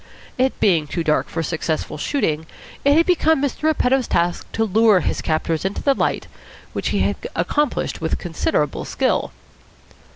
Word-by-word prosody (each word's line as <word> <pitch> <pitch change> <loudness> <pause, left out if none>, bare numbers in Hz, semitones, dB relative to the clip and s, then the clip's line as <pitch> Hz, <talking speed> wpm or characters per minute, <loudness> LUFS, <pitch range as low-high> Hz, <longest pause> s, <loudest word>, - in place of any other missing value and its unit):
It 260 +1 +1
being 170 -7 +3
too 165 +3 -2
dark 155 -1 +1
for 165 - -2
successful 160 0 -2
shooting, 160 - -1 0.4
it 285 +2 +4
had 335 - +5
become 320 -4 +3
Mr. 280 -1 -2
Repetto's 265 -5 +2
task 175 0 -1
to 225 - +1
lure 215 -2 +4
his - - -2
captors 160 0 -1
into 190 +1 -3
the 280 - +4
light, - - -1 0.5
which - - -2
he - - 0
had - - +1 0.2
accomplished 295 - -1
with 160 - -1
considerable 155 -3 -1
skill. - - 0
195 Hz, 160 wpm, -21 LUFS, -, 0.5 s, had